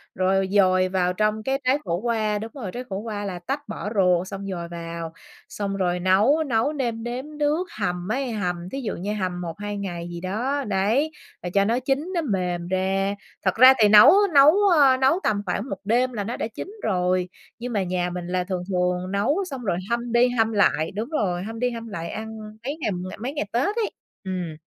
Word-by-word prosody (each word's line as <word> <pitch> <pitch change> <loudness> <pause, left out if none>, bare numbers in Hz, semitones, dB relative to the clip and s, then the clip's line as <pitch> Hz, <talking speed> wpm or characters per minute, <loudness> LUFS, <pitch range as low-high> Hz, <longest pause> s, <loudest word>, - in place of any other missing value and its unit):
rồi 190 +1 +2
dồi 185 -2 +4
vào 180 -1 +1
trong 215 +2 0
cái 270 +2 0
trái 260 +3 +3
khổ 170 -1 0
qua 215 -3 0
đúng 225 +1 -6
rồi, 220 -10 -6
trái 250 +1 -5
khổ 190 - -3
qua 205 -1 -4
là 180 -3 -4
tách 275 +10 -4
bỏ 205 - -5
ruột, 180 -2 +3
xong 195 0 -6
dồi 170 -2 -4
vào, 170 -1 -6 0.4
xong 200 -1 -3
rồi 180 -2 0
nấu, 205 - +3
nấu 255 +2 +1
nêm 235 -5 -2
nếm 260 +5 -5
nước. 300 +5 +1
Hầm 180 -2 -2
ấy, 265 -1 -1
hầm 180 -4 -3
thí 270 - -4
dụ 230 - -3
như 200 +4 -3
hầm 185 -3 -3
1,2 205 +5 -5
ngày 175 -3 -5
gì 170 0 -6
đó, 250 +10 -1
đấy, 215 +11 +1 0.3
rồi 175 - -4
cho 200 0 +4
nó 235 +4 +1
chín 270 +2 0
nó 340 - +1
mềm 180 - -2
ra. 195 +2 0 0.3
Thật 185 - +2
ra 255 +3 +9
thì 210 - +7
nấu 210 - +9 0.2
nấu, 285 +2 +8 0.2
ơ, 275 -5 +5
nấu 265 +7 +3
tầm 205 -1 +1
khoảng 200 +7 -2
1 195 - -4
đêm 245 +3 +2
là 205 -3 -2
nó 235 +4 -4
đã - - -2
chín 225 - -7 0.2
rồi, 180 -2 +1 0.3
nhưng 245 0 -5
mà 200 -2 +1
nhà 180 -1 -1
mình 175 0 -5
là 180 0 0
thường 180 -1 -3
thường 180 0 0
nấu 285 - +1
xong 260 -3 -6
rồi 185 -5 0
hâm 235 0 -1
đi 240 +1 +4
hâm 225 -2 +1
lại. 200 -6 +2
Đúng 220 +7 -4
rồi, 185 - -1
hâm 225 +2 -6
đi 250 - +1
hâm 230 -1 -6
lại 170 -5 -5
ăn 220 0 -6 0.3
mấy 290 +3 -3
ngày - - 0 0.3
mấy 255 +6 -4
ngày 290 - -1
Tết 240 +2 +1
ấy. 455 -3 -1 0.3
Ừm. 180 -4 -4
205 Hz, 220 wpm, -24 LUFS, 185-245 Hz, 0.4 s, ra